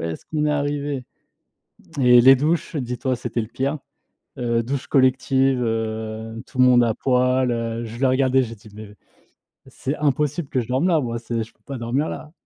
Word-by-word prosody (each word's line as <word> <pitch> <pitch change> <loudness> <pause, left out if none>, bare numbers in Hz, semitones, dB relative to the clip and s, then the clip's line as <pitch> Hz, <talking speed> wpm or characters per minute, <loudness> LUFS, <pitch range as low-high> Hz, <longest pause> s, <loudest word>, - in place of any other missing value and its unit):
est-ce 80 0 -5
qu'on 150 -1 -1
est - - +1
arrivés?» 145 -2 -2 1.0
et 125 -2 +7
les 135 +2 +8
douches, 155 +5 -1
dis-toi 130 -1 -2
c'était 120 0 -3
le 110 - -6
pire, 135 +6 -2 0.6
heu, 115 -1 0
douche 135 +1 -4
collective, 130 0 +2
heu, 110 0 -3
tout - - -11
le 130 - +7
monde 125 -1 +6
à 115 -2 +1
poil, 125 0 +1
heu, 115 0 -3
je 115 +1 -8
l'ai 135 - +3
regardé, 130 0 +3
j'ai 115 -1 -6
dit: 105 +1 -16
«Mais, 105 -1 -10 0.7
c'est 140 +3 -4
impossible 150 +1 0
que 130 - 0
je - - -9
dorme 130 +8 +1
là 165 -3 +3
moi, 120 -3 -3
c'est 115 -1 -3
je 110 - -10
peux - - -41
pas 140 - -5
dormir 125 +6 -1
là». 150 - -7
125 Hz, 195 wpm, -22 LUFS, 115-140 Hz, 1.0 s, les